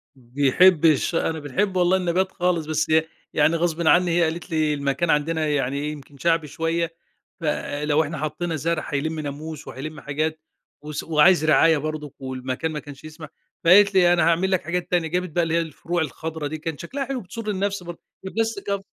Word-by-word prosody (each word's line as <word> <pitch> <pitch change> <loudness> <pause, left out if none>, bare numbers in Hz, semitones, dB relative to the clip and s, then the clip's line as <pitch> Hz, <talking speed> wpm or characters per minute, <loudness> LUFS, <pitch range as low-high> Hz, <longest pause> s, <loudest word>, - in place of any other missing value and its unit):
بيحب 145 +7 +3
الش 155 +1 +3
أنا 160 -1 0
باحب 185 +7 -1
والله 180 +1 +3
النبات 185 +1 0
خالص، 175 -3 0
بس 155 0 -1
ي 160 0 +5 0.3
يعني 165 - +3
غصبٍ 170 0 0
عني 175 +1 +5
هي 170 +1 +3
قالت 170 +3 -3
لي 155 -2 +1
المكان 140 +3 -1
عندنا 155 +1 +1
يعني 140 0 -1
يمكن 145 -1 -11
شعبي 165 +2 +1
شوية، 165 +2 -2 0.5
فلو 150 0 0
إحنا 155 +1 -5
حطينا 155 +3 -3
زرع 160 +1 -2
هيلم 155 +3 -1
ناموس، 150 +1 -6
وهيلم 155 +4 -7
حاجات 155 +2 -2 0.4
وس 150 0 -5
وعايز 160 +1 +4
رعاية 155 +2 +5
برضه 150 -1 -5
والمكان 130 +3 -4
ما 150 - -4
كانش 145 -1 -12
يسمح، 155 0 -10 0.3
فقالت 200 +4 +6
لي: 175 -2 +5
"أنا 175 - +3
هاعمل 175 +3 +2
لك 185 - +2
حاجات 175 +2 -3
تانية" 175 -2 +2
جابت 180 +3 -2
بقى 170 +2 0
اللي 165 -1 -1
هي 170 - +3
الفروع 165 +2 -3
الخضرا 160 0 -4
دي، 155 +2 -5
كان 160 -1 -5
شكلها 270 - -4
حلو 265 -2 -4
بتسر 215 +4 -7
النفس 200 -1 -2
برضه 175 -1 -8 0.3
وبلاستيك 220 0 -2
آه، 200 -1 -1
160 Hz, 185 wpm, -23 LUFS, 150-175 Hz, 0.5 s, فقالت